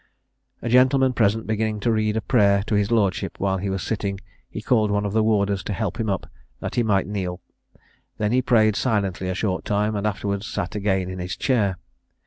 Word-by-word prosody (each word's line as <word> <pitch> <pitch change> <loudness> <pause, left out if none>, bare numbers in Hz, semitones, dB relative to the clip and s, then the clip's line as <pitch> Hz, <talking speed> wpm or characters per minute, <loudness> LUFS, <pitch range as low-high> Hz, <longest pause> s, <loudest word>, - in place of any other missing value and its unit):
A - - -2
gentleman 130 +1 +4
present 110 0 +1
beginning 110 -1 -1
to 115 - +1
read 110 -1 +1
a - - 0
prayer 100 -4 +3
to 110 - -4
his 105 -1 +2
lordship 105 -5 0
while 95 -1 0
he 100 +1 -3
was 95 -1 -2
sitting, 100 -3 -2 0.3
he - - -6
called 110 -1 +2
one 105 0 0
of 100 - -2
the 110 - +3
warders 100 -3 +1
to 105 - -2
help 100 -1 -3
him 110 -2 -1
up, 95 -2 -1 0.3
that - - -5
he 120 - +2
might 105 -4 +2
kneel. 95 -2 -4 0.4
He - - -27 0.4
then 110 +5 +1
prayed 110 -4 +3
silently 100 -6 -1
a 95 - -2
short 95 -2 -1
time, 105 +1 0
and 100 +1 -1
afterwards 100 0 -2
sat - - -3
again 95 -3 0
in 95 0 -6
his 90 0 -4
chair. 105 -8 +1
105 Hz, 210 wpm, -23 LUFS, 100-110 Hz, 0.4 s, gentleman